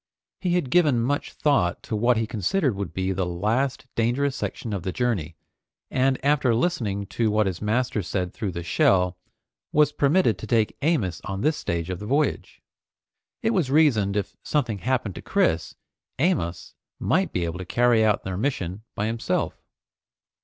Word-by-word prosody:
He 180 -2 0
had 145 -8 -1
given 150 -8 +4
much 140 +5 -1
thought 135 - +1
to 110 - -3
what 120 +2 +3
he 115 - +1
considered 115 - 0
would 95 -5 -4
be 95 +3 -1
the 95 0 -1
last 110 +11 -1
dangerous 130 +4 +1
section 115 -4 -4
of 100 - -2
the 95 - -3
journey, 95 -9 -1 0.6
and 130 0 +2
after 140 -5 +3
listening 110 - 0
to 110 +3 0
what 105 0 +2
his 95 -3 -3
master 110 +1 0
said 90 0 -3
through 100 -5 -3
the 85 - -4
shell, 90 +1 +3 0.6
was 150 0 +4
permitted 145 - +2
to - - -7
take 110 -3 +2
Amos 125 - 0
on 95 0 -4
this 155 +3 +2
stage 85 +1 -2
of 90 - -4
the 105 - -7
voyage. 145 +5 -1 0.8
It 225 - +2
was 180 - +1
reasoned 120 -10 +3
if 100 -1 -3
something 120 -9 -1
happened 120 -3 -1
to - - -8
Chris, 80 0 0 0.4
Amos 130 - -1 0.2
might - - +1
be 90 - -1
able 85 +1 -4
to 95 - -5
carry 120 +3 +3
out 105 -2 +2
their 95 -1 -4
mission 100 -6 -2
by 105 - -1
himself. 115 +1 -2
110 Hz, 175 wpm, -25 LUFS, 95-135 Hz, 0.8 s, given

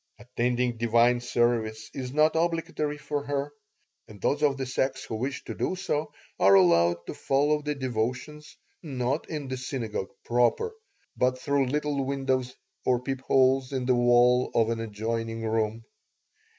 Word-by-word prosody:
Attending 120 0 -1
divine 120 +1 +3
service 115 -3 0
is 130 -2 -5
not 155 +2 +4
obligatory 165 -3 -1
for 145 0 -3
her, 145 0 -2 0.5
and 105 -2 -13
those 145 +8 0
of 145 -2 +2
the 135 - -3
sex 130 +1 -1
who - - -7
wish 130 +5 -3
to - - -6
do - - -2
so 155 -5 -2 0.3
are 100 0 +6
allowed 85 -2 +5
to - - -5
follow 145 +2 +1
the 150 0 -2
devotions 130 +4 -4 0.2
not 135 -1 -2
in 150 -4 -4
the 130 0 -4
synagogue 115 -6 -4 0.2
proper, 120 - +1 0.4
but 130 0 +1
through 140 0 0
little 145 0 -1
windows 130 -2 -1 0.3
or 125 -1 +2
peepholes 130 0 +1
in 130 -2 -2
the 130 - +3
wall 120 +1 +4
of 115 0 +3
an 115 - -2
adjoining 115 +1 -3
room. 110 0 -1
130 Hz, 150 wpm, -27 LUFS, 115-140 Hz, 0.5 s, are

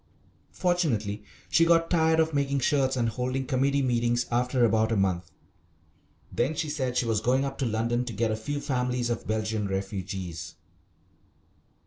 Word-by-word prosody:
Fortunately 115 - 0 0.2
she 165 - +4
got 165 0 +3
tired 160 -2 +3
of 160 0 +2
making 140 -1 +1
shirts 135 -1 +2
and 120 -2 +1
holding 130 +3 -2
committee 140 +1 +1
meetings 120 -1 +1
after 125 +1 +2
about 110 0 +2
a - - +2
month. 90 -4 0 1.0
Then 135 +7 0
she 155 -1 -2
said 130 -4 -2
she - - +2
was 110 -3 0
going 130 +4 +2
up 135 0 -5
to 135 - 0
London 115 +2 0
to 120 - -5
get 110 +2 0
a - - 0
few 145 +7 -4
families 125 -2 -1
of 115 - -4
Belgian 110 -1 -1
refugees. 95 -3 -4
120 Hz, 160 wpm, -27 LUFS, 110-140 Hz, 1.0 s, she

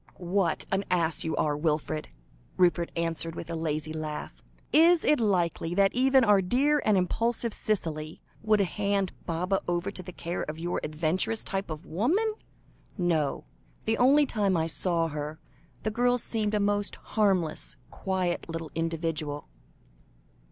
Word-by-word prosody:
"What 180 -1 0
an 195 0 +1
ass 165 -3 +1
you 160 - -1
are, 150 -1 +1
Wilfred," 155 0 -1 0.5
Rupert 175 -2 +3
answered, 165 0 -1
with 170 - -6
a - - -2
lazy 155 -1 -2
laugh. 155 -1 -5 0.3
"Is 335 +2 +6
it 300 - +4
likely 175 -5 0
that 195 0 +4
even 265 +1 +4
our 205 -3 +5
dear 275 +10 +2
and 215 -2 +3
impulsive 230 +5 0
Cicely, 160 -7 -2 0.2
would 215 -1 +3
hand 200 0 0 0.2
Baba 180 +3 0
over 175 +3 -1
to 190 - -6
the 180 0 -9
care 175 0 -4
of 155 +1 -5
your 175 +2 -2
adventuress 165 +8 0
type 195 -1 -3
of 155 +2 -6
woman? 340 - +1 0.6
No; 165 -6 0 0.4
the 225 0 +1
only 280 +4 +6
time 205 -7 +1
I 160 - +1
saw 165 0 +1
her, 150 +1 -5 0.4
the 215 - 0
girl 245 +2 +2
seemed 215 -3 0
a - - +2
most 205 0 +1 0.2
harmless, 190 -7 +1
quiet 185 -3 -2
little 165 -1 -5
individual." 165 -3 -2
180 Hz, 150 wpm, -28 LUFS, 165-210 Hz, 0.6 s, Is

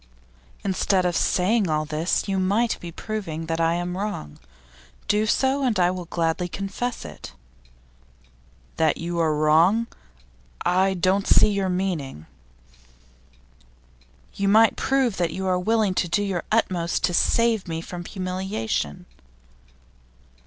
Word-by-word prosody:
'Instead 190 -1 +1
of 175 -1 0
saying 195 +3 +2
all 155 0 0
this, 155 +6 -1
you 195 -1 0
might 205 +5 +1
be 170 - -8
proving 170 -4 -5
that 165 0 -2
I 165 +1 +2
am 175 +1 -3
wrong. 190 - -5 0.7
Do 210 +1 +2
so, 265 +5 +1
and 235 -7 +1
I 175 0 +4
will 180 -1 -5
gladly 170 +1 -1
confess 195 +6 -4
it.' - - -10 1.4
'That 160 -2 +2
you 170 +1 -3
are 160 -2 +2
wrong? 165 +9 +4 0.8
I 190 +2 +2
don't 190 +2 +1
see - - +6
your 200 -2 -1
meaning.' 175 - -3 2.1
'You 200 - -1
might 220 +2 +5
prove 265 -6 +1
that 170 -3 0
you 190 +1 -4
are 185 -1 +1
willing 215 0 +1
to 180 - 0
do 205 +5 0
your 190 -4 -2
utmost 180 -7 0
to 180 -1 +1
save 230 +2 +2
me 165 -1 -3
from 175 +1 -7
humiliation. 185 - -3
185 Hz, 135 wpm, -24 LUFS, 170-205 Hz, 2.1 s, see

